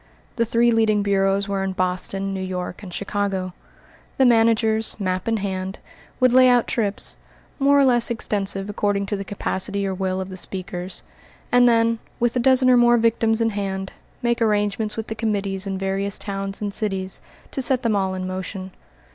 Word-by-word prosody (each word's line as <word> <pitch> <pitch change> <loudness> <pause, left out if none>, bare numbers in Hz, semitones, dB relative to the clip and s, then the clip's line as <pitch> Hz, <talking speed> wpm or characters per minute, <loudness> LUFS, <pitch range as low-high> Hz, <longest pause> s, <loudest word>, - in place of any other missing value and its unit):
The 230 - +2
three 235 +1 +3
leading 220 -2 +2
bureaus 195 0 +1
were 195 -1 -1
in 190 -1 -2
Boston, 185 +1 -1
New 190 - -4
York, 185 0 -5
and 190 -3 -9
Chicago. 195 -1 -2 0.6
The 265 - +4
managers, 225 -2 +3
map 185 -1 -2
in 225 -1 +1
hand, 190 -1 -4 0.4
would 255 -2 +4
lay 255 0 +7
out 245 -1 +4
trips, 210 -4 +1 0.4
more 280 +1 +4
or 275 - +5
less 240 -2 +4
extensive 200 -4 -2
according 205 -1 -1
to 205 - -2
the 195 - -4
capacity 200 0 -1
or 190 - -1
will 185 0 -2
of 190 0 -5
the 185 - -7
speakers, 185 -1 -4 0.5
and 245 0 +6
then, 230 -1 +2 0.2
with 240 +1 +1
a - - +2
dozen 260 +1 +4
or 250 - +6
more 240 0 +5
victims 225 0 +2
in 225 0 +2
hand, 195 -2 -4 0.3
make 235 0 0
arrangements 210 0 0
with 220 - -3
the 220 - -5
committees 200 -3 -2
in 195 -1 -3
various 195 +1 -1
towns 195 0 -2
and 205 -1 -3
cities 195 -3 -2 0.3
to 270 - -3
set 260 0 +2
them 225 -3 +1
all 190 -1 0
in 185 0 -4
motion. 185 +1 -5
205 Hz, 185 wpm, -22 LUFS, 195-230 Hz, 0.6 s, lay